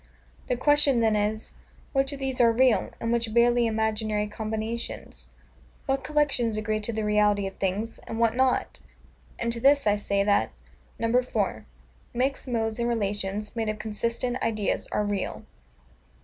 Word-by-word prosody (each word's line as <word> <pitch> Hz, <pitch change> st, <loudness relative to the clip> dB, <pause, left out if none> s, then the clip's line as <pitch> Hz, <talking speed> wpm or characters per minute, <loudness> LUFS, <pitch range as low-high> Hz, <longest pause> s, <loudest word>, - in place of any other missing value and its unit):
The 250 Hz, -, 0 dB
question 290 Hz, -1 st, +5 dB
then 220 Hz, -2 st, +3 dB
is, 210 Hz, +1 st, -2 dB, 0.4 s
Which 270 Hz, 0 st, +1 dB
of 280 Hz, -, -5 dB
these 265 Hz, -2 st, -1 dB
are 235 Hz, -1 st, +6 dB
real, 250 Hz, +1 st, +3 dB
and 230 Hz, 0 st, -1 dB
which 230 Hz, -2 st, -1 dB
barely 240 Hz, 0 st, +4 dB
imaginary 220 Hz, -1 st, 0 dB
combinations? 220 Hz, +2 st, -5 dB, 0.6 s
What 270 Hz, -1 st, -1 dB
collections 260 Hz, -6 st, +1 dB
agree 215 Hz, 0 st, -1 dB
to 215 Hz, +2 st, -2 dB
the 220 Hz, -1 st, -2 dB
reality 210 Hz, -1 st, +2 dB
of 195 Hz, -, -4 dB
things, 200 Hz, +4 st, -2 dB
and 225 Hz, -, -5 dB
what 230 Hz, -1 st, +2 dB
not? 260 Hz, 0 st, +1 dB, 0.6 s
And 235 Hz, 0 st, -1 dB
to 235 Hz, -, -4 dB
this 280 Hz, +2 st, +4 dB
I 205 Hz, -1 st, +4 dB
say 200 Hz, -1 st, 0 dB
that, 205 Hz, 0 st, +2 dB, 0.5 s
4. 230 Hz, -, 0 dB, 0.5 s
Mixed 265 Hz, +3 st, -1 dB
Modes 225 Hz, -2 st, -1 dB
and 235 Hz, 0 st, 0 dB
Relations, 205 Hz, -2 st, -2 dB
made 225 Hz, -2 st, -1 dB
of 215 Hz, -, -2 dB
consistent 230 Hz, +4 st, -2 dB
Ideas, 215 Hz, -3 st, -1 dB
are 210 Hz, -, 0 dB
real. 205 Hz, -2 st, -3 dB
225 Hz, 155 wpm, -26 LUFS, 210-245 Hz, 0.6 s, are